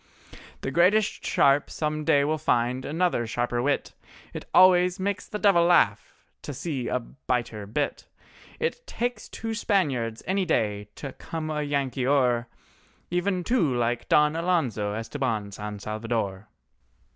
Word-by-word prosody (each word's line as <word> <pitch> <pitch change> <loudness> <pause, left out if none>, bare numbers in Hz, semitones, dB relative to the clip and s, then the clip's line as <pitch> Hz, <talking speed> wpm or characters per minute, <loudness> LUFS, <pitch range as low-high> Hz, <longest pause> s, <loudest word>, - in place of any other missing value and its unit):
The 135 - -3
greatest 190 +7 +3
sharp 140 +1 +3
some 155 0 -2
day 140 -1 +4
will 155 +2 0
find 125 -3 0
another 160 -7 0
sharper 120 +1 -1
wit, 140 +2 -1 0.4
It - - -6
always 180 0 +5
makes 200 0 -2
the 210 - -4
devil 200 -5 +4
laugh 175 0 +3 0.3
to 145 - -6
see 135 -5 -3
a 125 - 0
biter 120 -4 -4
bit; 140 +7 -2 0.5
It 485 +1 -3
takes 245 - -3
two 225 0 -5
Spaniards 140 - 0
any 190 +1 +1
day 105 - -1
to 135 -2 -7
come 155 -1 -5
a 150 -1 -1
Yankee 135 -3 -1
o'er: 125 -4 +2 0.6
Even 180 +1 0
two 170 - +1
like 120 0 -1
Don 150 +1 +4
Alonzo 135 - 0
Estabán 115 -3 -3
San 105 +1 -6
Salvador. 110 -1 -3
140 Hz, 140 wpm, -26 LUFS, 120-175 Hz, 0.6 s, always